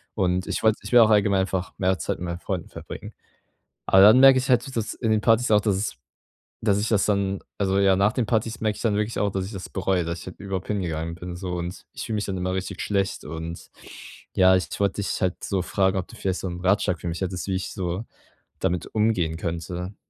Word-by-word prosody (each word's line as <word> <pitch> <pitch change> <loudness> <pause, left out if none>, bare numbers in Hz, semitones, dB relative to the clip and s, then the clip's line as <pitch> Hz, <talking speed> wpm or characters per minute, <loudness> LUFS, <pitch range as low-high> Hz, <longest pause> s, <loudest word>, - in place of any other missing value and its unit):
Und 90 -2 +1
ich - - -2
wollte 110 -1 +4
ich - - -7
will 120 - +7
auch 110 -2 +7
allgemein 100 -2 +4
einfach 95 -1 -2
mehr 95 0 +2
Zeit - - -3
mit 90 - -4
meinen 85 0 -4
Freunden 90 -1 -4
verbringen. - - -9 0.7
Aber 95 - +6
dann 110 +5 +8
merke 135 -1 +8
ich 130 - -4
halt, 125 +2 +2
dass 110 -1 -2
in 110 -3 -1
den 110 - +3
Partys 115 +1 +3
auch, 105 - +6
dass 100 -2 +1
es 100 +3 -2 0.7
dass 105 -2 +2
ich 105 - -1
das 105 -3 +3
dann 100 -2 0 0.2
also, 95 0 +2
ja, 95 -1 +4
nach 100 +3 +3
den 125 - 0
Partys 110 +1 0
merke 110 -2 0
ich - - -8
dann 110 -3 +2
wirklich 105 +2 -1
auch, 100 -1 +1
dass 95 -1 -2
ich 100 - -8
das 95 - -7
bereue, 95 -2 0
dass 85 0 -4
ich - - -10
halt 90 - -9
überhaupt 95 -1 -4
hingegangen 85 -5 -2
bin 90 0 -7
so. 90 0 -5
Und 85 +1 -5
ich - - -6
fühle 110 - -3
mich 105 - -1
dann 95 -2 -3
immer 90 +1 -2
richtig 95 0 -4
schlecht. 100 -2 -1
Und 80 +2 -7 0.7
ja, 95 0 +6
ich 90 - 0
wollte 100 0 +1
dich - - -3
halt 90 -1 -1
so 95 -2 -1
fragen, 95 0 +1
ob 95 - -3
du - - -13
vielleicht 95 -1 -2
so - - -3
'n 90 0 -6
Ratschlag 95 -2 +1
für - - -5
mich 85 0 -4
hättest, 95 0 -3
wie 95 - 0
ich 95 - -4
so 90 +3 -3 0.5
damit 90 0 -1
umgehen 95 -7 +1
könnte? 85 +3 -4
95 Hz, 245 wpm, -24 LUFS, 90-105 Hz, 0.7 s, dann